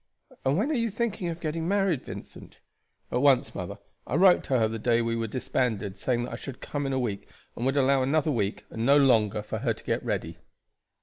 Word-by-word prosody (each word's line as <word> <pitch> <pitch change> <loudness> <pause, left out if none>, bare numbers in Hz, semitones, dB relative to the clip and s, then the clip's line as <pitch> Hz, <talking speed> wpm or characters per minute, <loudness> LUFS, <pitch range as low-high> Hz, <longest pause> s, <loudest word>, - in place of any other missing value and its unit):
"And 135 +3 +2
when 255 +10 +1
are - - +1
you 230 -4 +1
thinking 220 -4 -2
of 170 0 -4
getting 165 0 -3
married, 195 -7 +1
Vincent?" - - -10 0.5
"At 125 - +1
once, 135 -3 +4
mother. - - -5 0.3
I 125 - -2
wrote 180 +2 +6
to 130 - +1
her 110 -2 +3
the 115 +1 -4
day 120 +1 +2
we 115 0 0
were 115 0 -2
disbanded 110 -4 -1
saying 120 +3 0
that 120 - -6
I - - -4
should 130 0 -8
come 145 -1 -3
in 135 - -1
a - - +1
week, 110 -6 -3 0.3
and 120 - -2
would 135 +2 +1
allow 135 0 +4
another 150 +3 +1
week 105 -6 -2
and 110 - -3
no 140 +4 +6
longer 110 -7 +3
for - - -4
her - - 0
to - - -15
get - - -1
ready." - - -3
130 Hz, 230 wpm, -27 LUFS, 115-160 Hz, 0.5 s, wrote